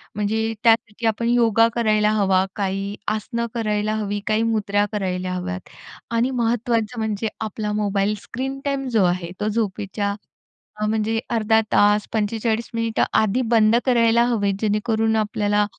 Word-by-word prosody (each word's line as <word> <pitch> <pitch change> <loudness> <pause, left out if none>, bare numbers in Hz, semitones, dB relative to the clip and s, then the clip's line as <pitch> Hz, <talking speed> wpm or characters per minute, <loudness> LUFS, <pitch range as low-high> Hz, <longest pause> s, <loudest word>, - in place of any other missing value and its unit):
म्हणजे 220 +2 -1
त्यासाठी 225 -1 +2
आपण 230 +2 0
योगा 230 -2 +4
करायला 215 -2 +2
हवा, 190 -3 +2
काही 195 0 -2
आसनं 225 +3 -2
करायला 215 -2 0
हवी, 205 -1 -2
काही 215 +1 +2
मुद्रा 205 -2 +1
करायला 185 -2 -2
हव्यात 185 +1 -5 0.5
आणि 245 +3 +2
महत्त्वाचं 235 -1 0
म्हणजे 220 0 -2
आपला 215 -1 -3
मोबाईल 205 0 0
स्क्रीन 270 +2 -5
टाईम 275 -1 -1
जो 220 -5 +3
आहे, 175 -1 -1
तो 210 - -1
झोपेच्या 205 -1 -2 0.7
अ, - - +1
म्हणजे 220 +1 0
अर्धा 220 -1 +3
तास, 205 0 +4
45 225 +1 -1
मिनिटं 230 -1 0 0.2
आधी 220 +4 +1
बंद 220 0 +5
करायला 235 -2 +4
हवेत. 205 -5 +1
जेणेकरून 220 +1 +1
आपल्याला 210 -1 +1
215 Hz, 140 wpm, -22 LUFS, 205-230 Hz, 0.7 s, बंद